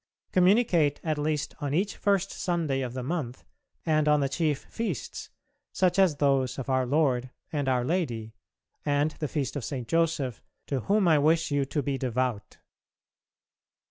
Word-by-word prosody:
Communicate 180 -6 +3
at 155 -2 -1
least 150 0 -1
on 145 0 -1
each 195 +4 0
first 195 -2 +1
Sunday 165 -7 -1
of 125 -2 -4
the 130 - -3
month 135 -4 -3 0.4
and 155 -2 +2
on 150 0 +5
the 140 - +1
chief 150 0 0
feasts, 210 - -4 0.4
such 185 0 +2
as 185 -6 +4
those 135 -3 +1
of 135 0 -3
Our 130 -1 +2
Lord, 130 -3 +1 0.2
and 145 -3 0
our 125 -2 +1
Lady, 120 -10 -2 0.5
and 145 +1 +1
the 150 0 -4
feast 140 -3 -2
of 145 - -3
St. 125 -3 -4
Joseph, 160 -6 0 0.2
to 135 - -1
whom 200 - +2
I 155 -3 +5
wish 160 +2 +2
you 140 -1 +1
to 140 +1 -2
be 135 -1 -2
devout. 125 -4 -2
145 Hz, 165 wpm, -28 LUFS, 130-165 Hz, 0.5 s, on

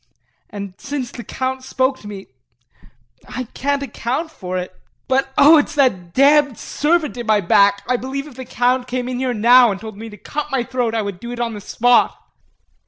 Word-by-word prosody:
And 200 -3 -7
since 275 -3 -4
the 240 - -8
Count 260 +1 -4
spoke 260 0 0
to 210 - -12
me 200 -2 -8 1.0
I 255 - -5
can't 280 0 -1
account 270 +5 -3
for 185 -10 -5
it 180 0 -5 0.3
but 265 +1 +1
oh, 305 +2 +8
it 290 - 0
is - - -10
that 190 -12 +1
damned 285 -1 +4
servant 305 -3 0
in 240 -2 -6
my 215 -1 +4
back 200 +2 +3
I 250 0 +1
believe 270 +3 -5
if 300 - -12
the 260 +1 -8
Count 250 +1 0
came 250 0 -3
in 250 -1 -3
here 255 -2 -1
now 240 +3 +6
and 195 - -4
told 220 -1 -9
me 225 +1 -8
to 210 - -12
cut 300 +7 -5
my 265 -3 0
throat 240 -2 -2
I 220 - 0
would 200 -3 -5
do 235 +3 -7
it 245 - -6
on 235 -1 -2
the 205 - -7
spot. 245 +4 +2
245 Hz, 210 wpm, -19 LUFS, 220-270 Hz, 1.0 s, oh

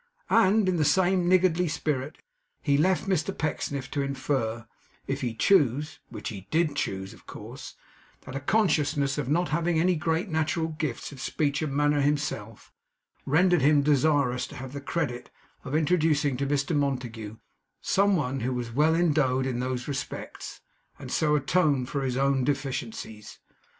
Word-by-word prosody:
And 215 -2 +4
in 185 -1 +1
the 155 - +2
same 180 +2 +3
niggardly 180 -1 +3
spirit, 150 -2 -3 0.4
he 140 -2 +2
left 185 +6 +2
Mr 190 0 0
Pecksniff 140 -3 -3
to 145 - -1
infer, 130 -5 -2 0.4
if 135 +1 -3
he 120 -3 -2
chose 150 - +2
(which - - -6
he 100 -4 -9
DID 160 0 +1
choose, 95 -6 -3
of - - -19
course), - - -9 0.5
that 130 - -9
a - - -1
consciousness 145 -5 +1
of 135 -3 -3
not 170 +4 +1
having 165 +1 +1
any 180 +2 +3
great 165 +4 -1
natural 160 0 0
gifts 155 -6 -4
of 135 -3 -10
speech 145 0 -1
and 145 -3 -2
manner 145 0 +2
himself, 140 -7 -2 0.5
rendered 175 +3 +4
him 145 +1 +4
desirous 140 -3 +2
to - - -11
have 130 +1 -8
the 140 - -5
credit 140 -5 -3 0.3
of 140 +2 -4
introducing 155 -3 +2
to 140 +1 -1
Mr 145 +3 0
Montague 120 -6 -2 0.4
some 200 0 +2
one 135 -5 -1
who 125 +2 -2
was 120 -2 -4
well 150 +6 +3
endowed 145 -6 +2
in 125 -2 -2
those 125 -1 -3
respects, 140 -2 -6 0.4
and - - -9
so 150 -1 +2
atone 145 -2 +2
for 140 +2 -3
his 130 -2 -1
own 135 -1 +2
deficiencies. 125 -6 -4
145 Hz, 160 wpm, -27 LUFS, 130-160 Hz, 0.5 s, And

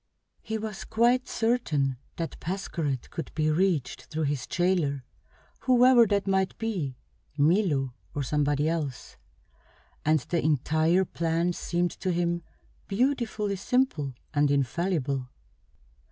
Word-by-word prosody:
He 220 - -3
was 215 -2 -5
quite 240 +3 +2
certain 155 - 0 0.2
that 165 -1 -5
Pascherette 165 -7 -3
could 165 - -5
be 155 -1 +2
reached 165 -5 0
through 160 0 -3
his 145 -2 -1
jailer, 170 -7 +1 0.6
whoever 250 -2 +6
that 200 -1 +1
might 190 -1 +1
be 185 - -2 0.4
Milo 150 - +2 0.2
or 145 - -1
somebody 145 +2 +1
else 155 -6 -3 0.9
and 155 +1 +4
the 170 +6 -1
entire 155 +5 +2
plan 170 +1 0
seemed 175 +1 -1
to 185 - -2
him 170 0 0 0.5
beautifully 215 -3 0
simple 185 - 0 0.2
and 145 -1 +3
infallible. 140 -1 0
170 Hz, 115 wpm, -27 LUFS, 145-200 Hz, 0.9 s, whoever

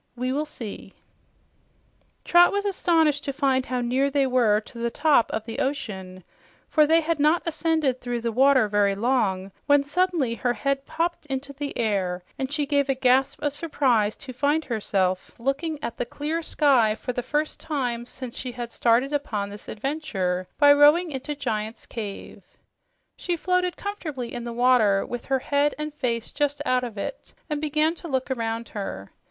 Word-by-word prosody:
We 255 +1 -2
will 300 +2 -1
see." 230 -8 -8 1.3
Trot 350 0 +6
was 405 0 -1
astonished 325 -7 +2
to 275 - -1
find 265 -2 +1
how 250 -1 -1
near 255 +3 +1
they 280 -1 +2
were 240 -5 +3
to 235 +2 -12
the 235 0 0
"top" 290 -2 +3
of 220 0 -3
the 225 - -5
ocean, 190 -9 -4 0.4
for 305 -2 +4
they 325 +2 +5
had 325 -1 -1
not 305 +4 +3
ascended 320 -5 0
through 245 -1 -3
the 230 0 -1
water 260 0 +4
very 205 -1 +2
long 200 -5 0 0.2
when 285 -1 +5
suddenly 320 -4 0
her 240 +1 0
head 275 +4 -2
popped 330 0 -2
into 270 0 -4
the 285 0 -5
air, 190 -5 -1 0.2
and 265 0 -2
she 290 0 0
gave 285 -1 +1
a 270 - +2
gasp 260 +1 +2
of 290 -1 0
surprise 260 -9 +1
to 260 -2 -10
find 290 +5 +1
herself 195 -5 -1
looking 280 +6 -1
at 235 - -4
the - - 0
clear 305 +6 -3
sky 260 -9 +3
for 250 - -5
the 245 - -2
first 295 +5 -2
time 245 -6 -3
since 255 -2 -7
she 250 -1 -4
had 240 -1 -6
started 245 +5 +2
upon 210 -8 -2
this 205 - -10
adventure 205 - -2
by 290 -1 +7
rowing 300 +4 +5
into 280 +2 -4
Giant's 220 -5 -3
Cave. 210 -4 -7 0.7
She 350 -1 -2
floated 365 +1 0
comfortably 310 -12 -5
in 240 -1 -5
the 235 - -4
water, 235 -5 +3
with 245 -1 -6
her 270 - +1
head 285 +2 +1
and 300 0 -4
face 235 -5 -2
just 290 0 -1
out 255 0 +2
of 230 -4 -6
it, 350 - -6 0.2
and 300 -1 -1
began 310 +1 +1
to 340 0 -9
look 265 -3 -2
around 230 -2 -2
her. 195 - -6
265 Hz, 180 wpm, -25 LUFS, 230-295 Hz, 1.3 s, by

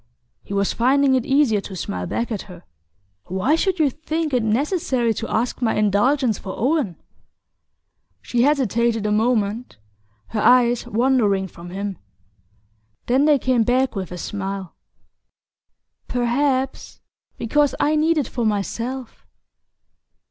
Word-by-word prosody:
He - - -14
was 200 0 +1
finding 270 +3 +3
it 255 -2 +1
easier 270 -7 +3
to 195 - -8
smile 90 - -4
back 235 +1 -2
at 205 -2 -5
her. 180 -1 -12 0.6
"Why 190 - 0
should 375 +3 +1
you 300 -4 +2
think 315 +1 -3
it 250 - +3
necessary 245 - 0
to 225 - -5
ask 240 +3 -1
my 230 -2 +1
indulgence 215 +4 +2
for 190 - -7
Owen?" 260 - 0 1.2
She 240 - -1
hesitated 235 -5 +1
a 210 - 0
moment, 220 - 0 0.5
her 220 - -2
eyes 245 0 +4
wandering 215 -5 +2
from 175 -1 -12
him. 195 0 -5 1.1
Then 260 +4 +3
they 300 -2 +5
came 255 -2 +1
back 250 +3 +1
with 190 -3 -4
a 180 - -6
smile. 195 -1 -5 1.3
"Perhaps 260 +2 -1 0.4
because 290 +4 +1
I 300 +1 +2
need 315 +2 +2
it 285 - 0
for 240 - -3
myself." 230 +4 -3
240 Hz, 135 wpm, -21 LUFS, 205-270 Hz, 1.3 s, they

